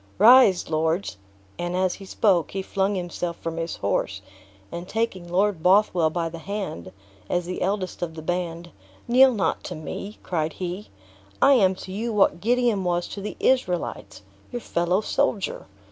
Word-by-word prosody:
Rise, 220 -3 +7
lords!" 160 - -1 0.4
and 175 +1 -2
as 185 0 +1
he 195 - -10
spoke, 190 -3 +2
he 195 0 -2
flung 195 +1 0
himself 175 -1 -4
from 165 0 -5
his 165 0 -3
horse, 95 -1 -2 0.5
and 175 +1 -6
taking 190 -6 -2
Lord 190 -1 +1
Bothwell 180 -3 +4
by 165 +1 -2
the 165 0 -7
hand, 190 - -5 0.4
as 175 0 0
the 180 +1 -5
eldest 190 -1 -2
of 165 -2 -3
the 160 - -8
band, 170 0 -3 0.4
"kneel 260 +2 +6
not 210 -6 -1
to - - -5
me," 195 +6 -7
cried 160 -3 -2
he; 180 +5 -5 0.5
"I 280 - +6
am 190 -7 +4
to 185 - -9
you 225 +5 -3
what 200 -4 +2
Gideon 235 -3 +2
was 175 -1 0
to 200 - -6
the 210 - -6
Israelites 170 - -1 0.3
your 245 - -4
fellow 175 +2 0
soldier. 205 -1 -1
180 Hz, 165 wpm, -24 LUFS, 170-205 Hz, 0.5 s, Rise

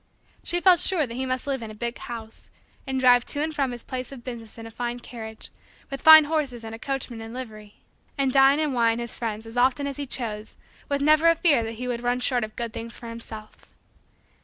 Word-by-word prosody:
She 350 - 0
felt 360 -1 +6
sure 360 -4 +2
that 230 - -8
he 260 +2 -3
must 255 0 -2
live 275 -3 -2
in 225 - -6
a 215 - -9
big 235 +2 -4
house, 225 -2 -9 0.4
and 265 0 -1
drive 245 -2 +6
to 290 - -1
and 315 0 -2
from 275 -3 0
his 240 -1 -7
place 255 -1 -5
of 260 -3 -10
business 235 -3 -7
in 225 - -8
a 225 - -9
fine 240 +1 -4
carriage, 220 -2 -9 0.4
with 275 - -5
fine 315 0 +10
horses 290 -6 -2
and 225 0 -7
a 225 - -7
coachman 260 -3 -4
in 225 +1 -8
livery, 215 -5 -9 0.4
and 270 -2 +1
dine 270 +2 +5
and 305 -3 0
wine 230 -2 +2
his 235 -1 -5
friends 220 -1 -3
as 225 +2 -8
often 260 +3 +3
as 280 -1 -4
he 285 -1 -4
chose 220 -4 -4 0.3
with 280 0 0
never 310 +2 +5
a 335 - +4
fear 320 -7 +3
that 225 0 -4
he 250 +3 -5
would 240 -1 -2
run 245 +1 0
short 250 -1 +1
of 215 0 -6
good 235 -2 -4
things 230 0 -7
for 235 - -9
himself. 220 -2 -10
245 Hz, 235 wpm, -25 LUFS, 230-275 Hz, 0.4 s, fine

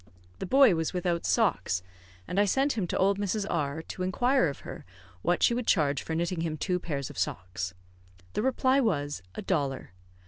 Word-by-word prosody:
The - - -4
boy 265 -2 +6
was 165 +1 -1
without 175 -2 -1
socks, 185 - +1 0.4
and 195 - -1
I 205 - +5
sent 270 +8 +2
him 200 -6 -1
to - - -2
old 195 +1 +2
Mrs. 205 0 -1
R, 150 -1 -1
to 185 - -7
inquire 245 +6 +2
of 140 - -5
her - - -8 0.4
what 175 - +1
she - - +5
would 240 -1 -2
charge 145 -6 +2
for 160 - -4
knitting 170 +1 -1
him 160 -2 -2
two 180 +3 0
pairs 140 -6 -4
of - - -8
socks. 90 0 -3 0.6
The - - 0
reply 260 +2 +2
was, 145 - 0
a - - -5
dollar. 140 - -1
175 Hz, 195 wpm, -28 LUFS, 145-210 Hz, 0.6 s, boy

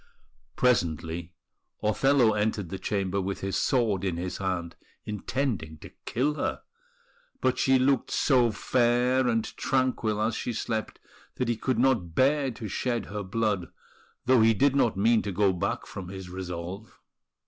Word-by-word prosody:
Presently 85 -7 0 0.5
Othello 120 +2 +3
entered 105 -3 -1
the 95 - -5
chamber 100 -1 -1
with 95 +1 -4
his 95 0 -2
sword 110 -7 +1
in 90 -4 -1
his 90 +1 -4
hand, 90 -3 -3 0.3
intending 105 - -3
to - - -12 0.2
kill 140 +5 +1
her; - - -3 0.8
but - - +1
she 135 -1 +4
looked 130 -1 +2
so 125 -4 +3
fair 125 +4 +2
and 115 -2 +1
tranquil 125 -5 0
as 110 +2 +1
she 120 - -3
slept 110 -1 -3 0.4
that 125 - -1
he 120 - +1
could 125 +2 -1
not 115 -10 +1
bear 140 +1 +3
to 115 -2 -6
shed 120 +3 -2
her 105 - -2
blood, 100 -2 -1 0.5
though 130 -2 +5
he 110 0 +5
did 140 +5 +3
not 120 -7 +2
mean 115 +3 +4
to 105 - -4
go 95 0 +2
back 95 +3 -2
from 95 -2 -8
his 95 -1 -8
resolve. 90 +2 -6
110 Hz, 155 wpm, -27 LUFS, 95-125 Hz, 0.8 s, though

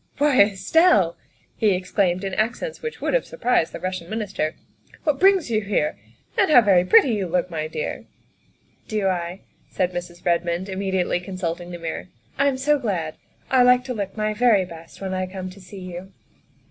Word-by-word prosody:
' - - -46
' - - -38
Why, 290 -4 +4
Estelle, 200 - +4
' - - -37
' - - -39
he 210 -4 +3
exclaimed 185 0 0
in 195 -1 -3
accents 240 - -2
which 465 - -6
would - - -1
have - - +3
surprised 250 - 0
the - - -7
Russian 185 -2 -4
Minister, 200 -8 -2 0.2
" - - -25
what 295 -3 +1
brings 380 -8 +4
you 215 -1 +2
here? 210 +10 0 0.4
And 390 - +3
how 255 -5 +8
very 190 -5 +4
pretty 185 +8 +6
you 200 -4 -1
look, 180 +1 -1
my 155 -1 -3
dear." 155 - -5 0.4
" - - -38
Do 210 -4 0
I? 175 0 -3
" - - -37
said 180 -1 -1
Mrs. 175 0 -7
Redmond, 175 +2 0
immediately 190 -2 -1
consulting 180 -2 -4
the 175 - -6
mirror. 160 - -5 0.2
" 115 - -34
I'm 280 -1 +2
so 295 +2 +2
glad. 180 - -2 0.4
I 260 -1 +5
like 250 0 +5
to 255 0 -4
look 200 -2 -5
my 215 0 0
very 215 -4 +3
best 165 0 -13
when 190 -1 -3
I 185 0 -2
come 185 0 -6
to 195 +1 -14
see 190 +1 -11
you." 180 +1 -8
190 Hz, 210 wpm, -23 LUFS, 175-235 Hz, 0.4 s, how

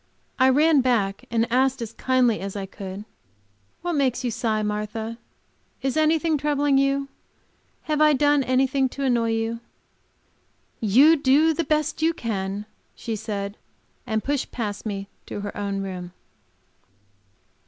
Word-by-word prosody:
I 260 0 +6
ran 295 +2 +4
back 210 -6 0
and 230 -1 +1
asked, 265 +1 +2
as 230 -1 -6
kindly 250 -4 +2
as 195 +1 -5
I 200 -1 -3
could, 195 +1 -8 0.8
"What 350 0 -1
makes 270 -4 +1
you 245 - -1
sigh, 220 -2 -1
Martha? 215 +2 -3 0.6
Is 270 0 0
anything 315 0 +2
troubling 290 -1 +2
you? 275 0 +1 0.8
Have 305 -1 -1
I 305 0 +6
done 290 +1 +3
anything 265 +1 +2
to 280 - -2
annoy 235 -3 +2
you?" 225 +1 -2 1.2
"You 265 +10 +5
do 290 +3 +4
the 335 - -1
best 305 +1 0
you 325 +1 +2
can," 200 -4 -3 0.3
she 225 - -4
said, 205 -1 -4 0.5
and 220 -2 -1
pushed 285 -1 -2
past 215 -2 -4
me 200 -1 -4 0.2
to 205 - -5
her 205 - -6
own 200 -1 -2
room. 180 -2 -6
245 Hz, 145 wpm, -24 LUFS, 210-285 Hz, 1.2 s, I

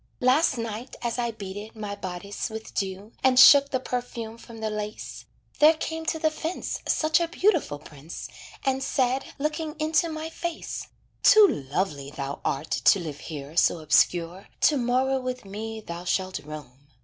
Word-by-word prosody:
"Last 260 +2 +3
night 230 +2 -5
as 235 +1 -1
I 235 -1 0
beaded 205 0 -7
my 210 -2 -5
bodice 200 +2 -5
with 220 0 -8
dew, 195 +2 -3
And 255 -1 +5
shook 280 +1 +9
the 260 - 0
perfume 240 -3 -5
from 230 -1 -12
the 220 -1 -3
lace, 210 0 -6 0.3
There 310 +2 +7
came 320 +1 -4
to 320 - +1
the 315 0 +1
fence 325 +3 -4
Such 310 +1 +3
a 340 - 0
beautiful 335 - +1
prince, 150 +2 -9 0.4
And 265 0 +1
said, 260 0 +1
looking 305 +1 -2
into 315 +2 +2
my 315 0 -5
face: 340 0 -5 0.3
"Too 430 -1 +8 0.2
lovely 145 -4 -1
thou 140 0 -5
art 145 +3 -2
to 200 - +4
live 155 -5 -6
here 150 -1 -8
so 175 - +4
obscure 170 +3 +2
To 300 - +5
morrow 260 +2 +1
with 255 -2 -5
me 220 +3 -6
thou 170 -3 -7
shalt 185 -1 -1
roam. 145 -2 -11
225 Hz, 165 wpm, -26 LUFS, 185-280 Hz, 0.4 s, shook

